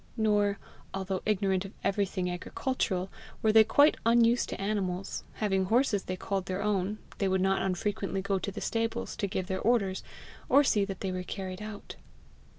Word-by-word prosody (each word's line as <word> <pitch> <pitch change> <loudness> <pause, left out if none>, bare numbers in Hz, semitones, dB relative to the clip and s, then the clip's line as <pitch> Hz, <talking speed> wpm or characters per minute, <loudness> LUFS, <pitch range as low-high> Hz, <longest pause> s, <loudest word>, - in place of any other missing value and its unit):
Nor, 205 -2 +2 0.4
although 190 -1 -2
ignorant 195 -3 +1
of 195 - -9
everything 195 -2 0
agricultural, 185 +1 -2 0.3
were 220 - +5
they 220 0 +8
quite 285 +7 +5
unused 235 +1 +4
to - - -5
animals; 195 -2 -2
having 195 -3 0
horses 220 -1 +2
they 185 - -3
called 190 0 -3
their 185 +1 -2
own, 205 0 0 0.2
they 195 - +2
would 190 0 +2
not 190 +1 +2
unfrequently 195 +1 -1
go 195 -1 0
to 200 - -3
the - - -7
stables 230 +1 -2
to 200 - -1
give 190 -1 -2
their 190 0 -3
orders, 200 -5 +2 0.5
or 280 +3 +6
see 210 -7 +3
that 195 -2 -6
they 190 - -1
were 185 0 -3
carried 185 +1 -6
out. 210 -1 -8
195 Hz, 175 wpm, -30 LUFS, 190-215 Hz, 0.5 s, they